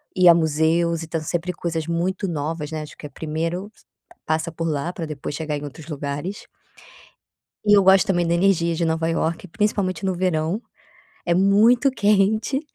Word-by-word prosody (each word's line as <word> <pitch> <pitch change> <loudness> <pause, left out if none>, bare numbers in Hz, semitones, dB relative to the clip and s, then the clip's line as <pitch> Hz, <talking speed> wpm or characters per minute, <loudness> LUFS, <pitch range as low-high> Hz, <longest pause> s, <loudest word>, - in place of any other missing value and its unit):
ir 185 -2 +5
a - - +10
museus 165 +1 +1
e - - -8
tanto 160 -1 -3
sempre 175 +3 -2
coisas 165 -2 -3
muito 180 +4 -1
novas, 155 -1 -3
né, 155 -1 -3
acho 150 - -10
que - - -10
é - - -6
primeiro, 165 +6 -4 0.6
passa 160 +1 -1
por 165 0 -3
lá 155 +3 -2
pra 165 -3 -5
depois 145 -1 -6
chegar 155 -2 -3
em 145 - -8
outros 145 +1 -9
lugares. 145 +6 -5 1.2
E 205 -1 +6
eu 200 - +5
gosto 190 0 +6
também 175 -3 +1
da 170 - +2
energia 170 -2 +2
de 170 - -1
Nova 160 0 0
Iorque, 165 +2 -1
principalmente 195 -2 -1
no 190 - +1
verão 175 +2 -1 0.6
é 170 - +1
muito 215 +8 +4
quente 215 +3 +2
170 Hz, 180 wpm, -22 LUFS, 160-190 Hz, 1.2 s, a